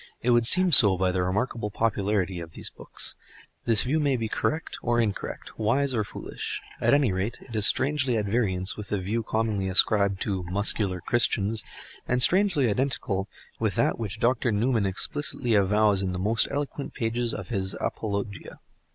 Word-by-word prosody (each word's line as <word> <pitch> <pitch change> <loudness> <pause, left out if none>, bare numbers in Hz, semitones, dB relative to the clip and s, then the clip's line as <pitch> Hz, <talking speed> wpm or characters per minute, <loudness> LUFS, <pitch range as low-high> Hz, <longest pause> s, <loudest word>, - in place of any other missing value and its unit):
It 125 - +2
would 120 -1 +4
seem 185 +5 +6
so 105 - +8
by 95 0 +1
the 90 0 -1
remarkable 105 +4 -2
popularity 100 -4 -1
of 80 -1 -9
these - - -6
books. - - -2 0.5
This 115 -2 +4
view 145 +5 0
may 145 -3 +1
be 115 -1 -3
correct 155 +8 -3
or 120 0 0
incorrect, 110 -1 -4
wise 130 +6 +1
or 110 -3 0
foolish; 100 - -6 0.2
at - - +4
any 140 -7 +2
rate, 95 +5 -3
it 115 - -9
is 105 -1 +3
strangely 130 -3 +1
at 105 - -1
variance 100 -4 0
with 105 -1 -8
the 105 - -1
view 100 +5 -2
commonly 110 -3 -2
ascribed 100 +1 +3
to 95 -3 -1
"Muscular 95 0 0
Christians," 110 -1 +1 0.4
and 125 - +1
strangely 185 -8 +3
identical 105 -4 -2 0.3
with - - -1
that - - +1
which 110 -2 -5
Dr. 120 0 +1
Newman 110 0 +1
explicitly 125 +4 -2
avows 105 0 +3
in 95 -1 -2
the - - -3
most 110 +5 +1
eloquent 145 0 -5
pages 115 0 -1
of 95 -4 -6
his 95 -3 -1
"Apologia." 100 -2 -4
110 Hz, 175 wpm, -26 LUFS, 100-120 Hz, 0.5 s, so